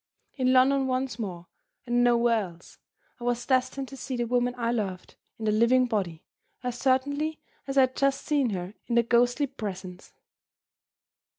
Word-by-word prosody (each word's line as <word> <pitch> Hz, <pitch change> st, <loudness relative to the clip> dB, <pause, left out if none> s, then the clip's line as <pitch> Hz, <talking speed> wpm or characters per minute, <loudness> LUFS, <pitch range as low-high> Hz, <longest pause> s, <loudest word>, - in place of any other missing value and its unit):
In 255 Hz, -2 st, +1 dB
London 265 Hz, +1 st, +4 dB
once 255 Hz, -1 st, -2 dB
more, 180 Hz, -6 st, -5 dB, 0.4 s
and 240 Hz, 0 st, +2 dB
nowhere 235 Hz, -3 st, +3 dB
else, 170 Hz, -1 st, -15 dB, 0.4 s
I -, -, -9 dB
was 245 Hz, 0 st, -1 dB
destined 260 Hz, +1 st, 0 dB
to 275 Hz, -, -9 dB
see 265 Hz, -1 st, -5 dB
the 240 Hz, -, 0 dB
woman 245 Hz, +1 st, 0 dB
I 235 Hz, -1 st, 0 dB
loved, 195 Hz, -6 st, -3 dB, 0.2 s
in 220 Hz, -, -5 dB
the 215 Hz, -, +3 dB
living 235 Hz, +4 st, +4 dB
body, 190 Hz, -9 st, -2 dB, 0.4 s
as 245 Hz, -1 st, -3 dB
certainly 285 Hz, +4 st, +1 dB, 0.3 s
as 275 Hz, 0 st, -3 dB
I -, -, +8 dB
had 260 Hz, 0 st, +2 dB
just 275 Hz, 0 st, +1 dB
seen 285 Hz, -5 st, +2 dB
her 185 Hz, -1 st, -4 dB
in 235 Hz, -, -1 dB
the 235 Hz, -, +5 dB
ghostly 245 Hz, +4 st, +3 dB
presence. 190 Hz, -8 st, -7 dB
245 Hz, 170 wpm, -27 LUFS, 220-260 Hz, 0.4 s, I